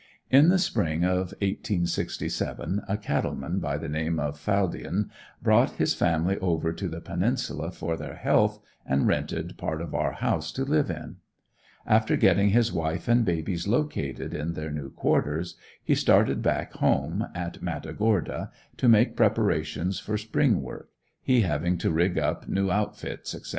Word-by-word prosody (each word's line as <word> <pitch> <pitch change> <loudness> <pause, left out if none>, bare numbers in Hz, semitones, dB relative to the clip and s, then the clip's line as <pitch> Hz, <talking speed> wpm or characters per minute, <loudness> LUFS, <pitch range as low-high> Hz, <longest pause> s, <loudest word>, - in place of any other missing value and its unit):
In 140 +5 +7
the 190 - +5
spring 85 - 0
of 90 +1 +1 0.2
1867, 95 0 -2
a 100 - +1
cattle 85 -9 -1
man 90 +3 -3
by 70 -5 -2
the 80 +2 -5
name 80 +2 -1
of 75 0 -2
Faldien 100 +1 -1 0.3
brought - - +4
his - - +1
family 85 +3 +1
over 80 -3 0
to 90 +3 -4
the 80 +1 -6
Peninsula - - -1
for 85 - -3
their - - -7
health - - +2 0.2
and 65 +1 +1
rented - - -1
part 80 - -2
of 85 -2 -6
our - - 0
house 80 0 -1
to 135 - -2
live 145 -3 +2
in. 80 -2 -6 0.7
After - - +3
getting 100 +1 +4
his 115 +2 +3
wife 80 +1 -2
and 120 0 +4
babies 85 0 -1
located 110 - -1
in 80 +3 -3
their 75 -1 -5
new 75 -2 -5
quarters, 80 +5 0 0.3
he - - +2
started - - +3
back - - 0
home, 80 +11 +1
in 85 -1 -3
Matagorda, 105 -4 -1 0.3
to 125 - +3
make 115 +1 +5
preparations 100 -6 +1
for 105 - -2
spring 110 +1 +1
work, - - -9 0.3
he 125 -2 +3
having 85 0 0
to 85 - 0
rig 85 +3 +1
up - - -1
new 95 -1 +1
outfits, 105 +2 -3
etc. - - -11
90 Hz, 160 wpm, -27 LUFS, 80-105 Hz, 0.7 s, In